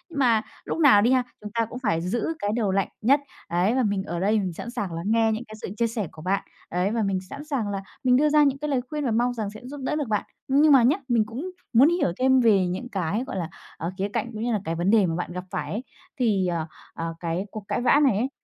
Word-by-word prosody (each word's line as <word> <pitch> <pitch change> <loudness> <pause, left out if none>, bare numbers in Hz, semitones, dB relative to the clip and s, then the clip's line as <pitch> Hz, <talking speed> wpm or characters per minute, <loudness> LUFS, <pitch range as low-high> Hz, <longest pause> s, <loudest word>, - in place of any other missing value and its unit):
Mà 235 -6 +3 0.2
lúc - - -3
nào 255 -10 +7
đi 235 - +3
ha, 255 -1 +4 0.2
chúng 210 -1 -7
ta 230 -1 +1
cũng 250 - -7
phải 165 -10 0
giữ 210 +6 -1
cái 205 0 -1
đầu 210 -5 +1
lạnh 195 0 +1
nhất. 275 +6 +4 0.3
Ấy, 180 +7 +1
và 260 - +2
mình 200 -2 0
ở 175 -3 -4
đây 210 +3 +2
mình 185 -3 -2
sẵn 235 - -7
sàng 195 -7 -4
lắng 165 +3 -5
nghe 225 -1 +3
những 220 +3 -2
cái 215 - -10
sự - - -5
chia 235 -1 +2
sẻ 220 -6 -3
của 155 - -12
bạn. 195 +3 0 0.3
Ấy, 180 +4 0
và 225 -2 0
mình 195 -2 0
sẵn 280 +1 -7
sàng 255 -9 -2
là 195 -1 -3 0.2
mình 250 -1 +4
đưa 300 +2 +4
ra 300 0 +5
những 275 -1 +2
cái 300 0 -3
lời 260 -3 +1
khuyên 300 -2 -3
và 240 - +1
mong 240 +2 +2
rằng 215 -4 -3
sẽ 215 - -10
giúp 285 +2 -7
đỡ 300 - -1
được 295 -5 -2
bạn. 210 - 0 0.2
Nhưng 290 +3 +5
mà 255 -3 +7
nhá, 280 +9 +4
mình 230 -3 +2
cũng 275 +12 -6 0.2
muốn 265 +7 +7
hiểu 345 - +1
thêm 260 0 +4
về 200 -6 +4
những 185 +8 -4
cái, 195 +3 -1
gọi 195 - -4
là, 170 -2 -3 0.3
ờ, 165 +3 -3
khía 195 +1 0
cạnh, 230 +2 -3
cũng 215 +1 -4
như 240 - 0
là 210 - 0
cái 165 - -2
vấn 175 +3 0
đề 215 -4 +5
mà 165 -1 -1
bạn 175 0 -3
gặp 180 0 -5
phải - - -3
ấy. 220 +6 -3 0.4
Thì, 205 -6 +2
ờ, 165 -2 -2 0.3
ờ, 165 0 -4
cái 175 +3 -2
cuộc 215 -2 -7
cãi - - 0
vã 280 +4 +5
này 255 -8 +4
ấy, 250 +5 0
220 Hz, 285 wpm, -25 LUFS, 190-255 Hz, 0.4 s, nào